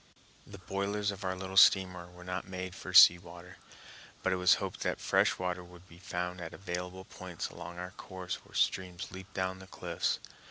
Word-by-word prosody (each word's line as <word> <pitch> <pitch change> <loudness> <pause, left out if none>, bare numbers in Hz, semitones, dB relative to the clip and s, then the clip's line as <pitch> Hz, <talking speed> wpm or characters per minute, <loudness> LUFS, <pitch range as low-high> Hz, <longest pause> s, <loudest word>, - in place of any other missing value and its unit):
The 100 - -10
boilers 100 +2 -1
of 100 0 -8
our 95 0 -1
little 95 +1 -6
steamer 90 -2 +5
were 90 0 -14
not 90 +1 -4
made 90 -1 -5
for 95 - -8
sea 90 -1 +10
water, 85 +1 -12 0.7
but 95 - +2
it - - 0
was 90 -1 +6
hoped - - -5
that - - -1
fresh - - +2
water 90 0 -2
would 90 +1 -15
be 85 0 -15
found 90 0 -4
at 85 - -7
available 90 0 -5
points 90 -4 -6
along 85 +1 -9
our 90 +1 -6
course 95 -1 -6
where - - -17
streams 90 -1 0
leap 95 +1 -10
down 95 0 -1
the 95 - -12
cliffs. 85 -3 -2
90 Hz, 195 wpm, -32 LUFS, 90-95 Hz, 0.7 s, sea